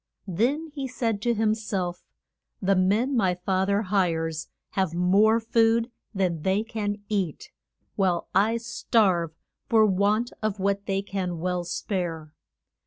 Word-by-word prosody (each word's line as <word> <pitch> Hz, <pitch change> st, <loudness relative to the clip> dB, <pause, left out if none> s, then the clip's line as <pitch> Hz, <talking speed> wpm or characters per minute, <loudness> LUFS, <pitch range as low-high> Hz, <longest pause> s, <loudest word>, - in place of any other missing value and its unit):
Then 265 Hz, -, 0 dB
he 275 Hz, -3 st, -3 dB
said 230 Hz, -5 st, -2 dB
to 235 Hz, +1 st, +1 dB
him 215 Hz, 0 st, +2 dB
self, 190 Hz, -5 st, -3 dB, 0.6 s
The 195 Hz, 0 st, +2 dB
men 210 Hz, +9 st, +2 dB
my 190 Hz, -6 st, +2 dB
fa 185 Hz, +1 st, 0 dB
ther 200 Hz, +1 st, +2 dB
hires 165 Hz, -5 st, 0 dB, 0.2 s
have 190 Hz, -4 st, 0 dB
more 200 Hz, +6 st, +4 dB
food 230 Hz, +1 st, +2 dB, 0.2 s
than 185 Hz, -6 st, -1 dB
they 190 Hz, +5 st, +1 dB
can 210 Hz, -2 st, -3 dB
eat, 195 Hz, -7 st, -2 dB, 0.5 s
while 185 Hz, -4 st, +1 dB
I 215 Hz, +5 st, +3 dB
starve 205 Hz, -8 st, +1 dB, 0.3 s
for 220 Hz, -2 st, +5 dB
want 205 Hz, +4 st, +2 dB
of 215 Hz, -2 st, -1 dB
what 200 Hz, +1 st, 0 dB
they 195 Hz, 0 st, 0 dB
can 185 Hz, -3 st, -3 dB
well 180 Hz, +1 st, -1 dB
spare. 165 Hz, -5 st, -3 dB
200 Hz, 140 wpm, -26 LUFS, 180-220 Hz, 0.6 s, for